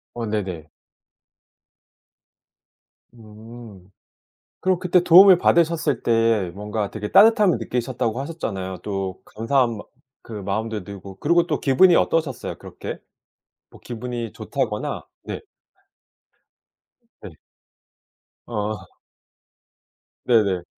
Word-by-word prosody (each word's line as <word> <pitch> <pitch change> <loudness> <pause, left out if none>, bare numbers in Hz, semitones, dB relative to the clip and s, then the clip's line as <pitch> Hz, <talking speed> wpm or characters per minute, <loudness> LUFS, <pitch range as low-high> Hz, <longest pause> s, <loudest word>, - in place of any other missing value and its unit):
어 120 -1 -4
네네. 95 -8 -4 2.5
음 110 -3 -13 0.7
그럼 185 -1 +1
그때 180 0 +3
도움을 185 +1 +8
받으셨을 170 -2 +2
때 115 -5 +2
뭔가 105 0 -4
되게 105 -1 -5
따뜻함을 210 -3 +5
느끼셨다고 120 -1 -2
하셨잖아요. 100 - -5
또 95 -2 -4
감사한 115 +1 0
마 - - -8 0.5
그 115 - -9
마음도 105 +1 -3
들고 100 -1 -11
그리고 170 +2 +3
또 150 - -2
기분이 170 +6 +5
어떠셨어요? 145 -7 0
그렇게? - - -8 0.7
뭐 - - -17
기분이 120 -2 -6
좋다거나 - - -3 0.2
네. - - -5 1.8
네. - - -9 1.2
아. 110 -2 -3 1.5
네네. 100 -7 +2
115 Hz, 210 characters per minute, -22 LUFS, 105-145 Hz, 2.5 s, 도움을